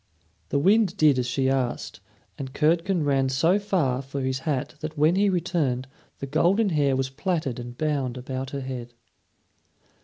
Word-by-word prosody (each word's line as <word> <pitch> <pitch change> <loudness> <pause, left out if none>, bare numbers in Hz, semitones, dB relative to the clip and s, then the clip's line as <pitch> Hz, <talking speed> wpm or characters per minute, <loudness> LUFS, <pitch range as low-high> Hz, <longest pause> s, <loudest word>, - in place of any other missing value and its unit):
The - - +1
wind 195 +4 +3
did 150 -6 +4
as 125 - -1
she 130 +2 0
asked, 130 -4 -1 0.4
and 135 -2 -7
Curdken 170 +3 +2
ran 135 -2 +2
so 165 +9 +3
far 160 -11 0
for 135 +1 -5
his 130 0 -1
hat 135 -4 -1
that 155 0 -6
when 155 +4 +4
he 200 +1 +3
returned 160 -8 0 0.3
the - - -5
golden 175 +9 +2
hair 145 -5 +2
was 130 0 -1
plaited 150 -4 -2
and 120 0 -8
bound 140 -5 -1
about 130 +1 -5
her 140 0 -4
head. 125 -2 -6
140 Hz, 165 wpm, -25 LUFS, 130-170 Hz, 0.4 s, did